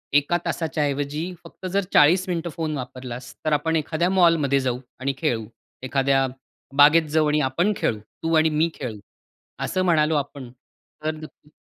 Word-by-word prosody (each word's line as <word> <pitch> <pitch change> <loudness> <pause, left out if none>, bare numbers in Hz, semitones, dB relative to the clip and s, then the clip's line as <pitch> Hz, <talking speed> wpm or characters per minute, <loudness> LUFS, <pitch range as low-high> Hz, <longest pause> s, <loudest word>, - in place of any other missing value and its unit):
1 145 +4 +3
तासाच्या 155 -2 -1
ऐवजी 145 +5 -2
फक्त 170 +2 -12
जर 200 - +3
40 180 +6 +5
मिनिटं 170 -1 -2
फोन 155 -1 -3
वापरलास 125 -1 -7
तर 155 - +2
आपण 160 +2 +1
एखाद्या 160 +2 0
मॉलमध्ये 165 -7 +3
जाऊ 125 -2 -1 0.2
आणि 135 +1 -1
खेळू. 120 -8 -1 0.4
एखाद्या 135 +1 +2 0.5
बागेत 150 +3 +7
जाऊ 155 -1 +3
आणि 150 0 +2
आपण 175 +10 +1
खेळू. 110 - 0 0.2
तू 165 - 0
आणि 160 0 +4
मी 155 +2 +1
खेळू. 120 -6 -6 0.7
असं 185 - -1
म्हणालो 160 -3 +3
आपण 140 -3 -4
तर 150 +4 -8
नक्की 155 -1 -13
150 Hz, 160 wpm, -23 LUFS, 135-165 Hz, 0.7 s, बागेत